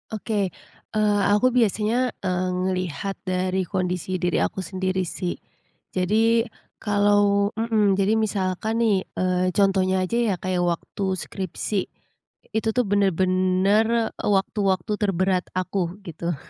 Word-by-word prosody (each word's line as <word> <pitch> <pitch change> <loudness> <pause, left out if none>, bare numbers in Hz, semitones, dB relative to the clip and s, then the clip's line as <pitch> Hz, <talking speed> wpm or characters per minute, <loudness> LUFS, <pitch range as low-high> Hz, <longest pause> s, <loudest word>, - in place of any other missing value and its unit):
Oke. 210 -3 -1 0.4
Eee, 210 -1 +2
aku 250 +5 +3
biasanya, 230 +2 +2
eee, 185 -1 -1
ngelihat 185 0 -2
dari 185 0 0
kondisi 180 0 -2
diri 175 0 +1
aku - - -2
sendiri 185 0 -2
sih. 175 +1 -4 0.6
Jadi, 225 +5 +3 0.4
kalau 205 0 +3
mhm, 220 -3 +2
jadi 200 +3 +2
misalkan 215 +2 -1
nih, 200 -4 +1
eee, 185 0 0
contohnya 190 -2 +2
aja 210 +6 -1
ya 225 -5 +1
kayak 185 0 -2
waktu 175 +3 -3
skripsi. 190 +1 -3 0.7
Itu 220 0 0
tuh 250 - +3
benar-benar 195 +3 +2
waktu-waktu 195 -1 0
terberat 190 -2 +1
aku, 185 -1 -1
gitu. 170 -1 -4
195 Hz, 115 wpm, -24 LUFS, 185-210 Hz, 0.7 s, aku